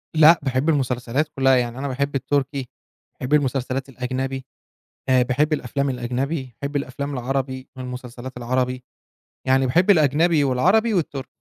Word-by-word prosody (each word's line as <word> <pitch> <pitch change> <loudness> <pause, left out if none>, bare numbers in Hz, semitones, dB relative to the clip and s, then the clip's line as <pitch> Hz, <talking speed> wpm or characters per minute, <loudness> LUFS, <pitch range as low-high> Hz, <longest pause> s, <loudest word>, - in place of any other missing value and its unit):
لأ، 160 +2 +7
باحب 135 +3 0
المسلسلات 130 0 0
كلها 135 -1 +4
يعني، 120 0 -1
أنا 140 - -3
باحب 140 +2 -2
التركي، 135 -1 -1 0.5
باحب 130 +3 -2
المسلسلات 135 -1 0
الأجنبي، 130 +1 -4 0.6
آآ 130 -1 +5
باحب 140 +5 +1
الأفلام 140 0 -1
الأجنبي، 130 +1 -3
باحب 145 +1 -3
الأفلام 140 +1 -3
العربي، 130 +1 -3
والمسلسلات 125 0 -7
العربي، 125 +1 -1 0.6
يعني 130 0 +3
باحب 175 +10 +3
الأجنبي، 155 -1 +4
والعربي، 190 - +3
والتركي. 145 -6 -2
135 Hz, 130 wpm, -22 LUFS, 125-145 Hz, 0.6 s, لأ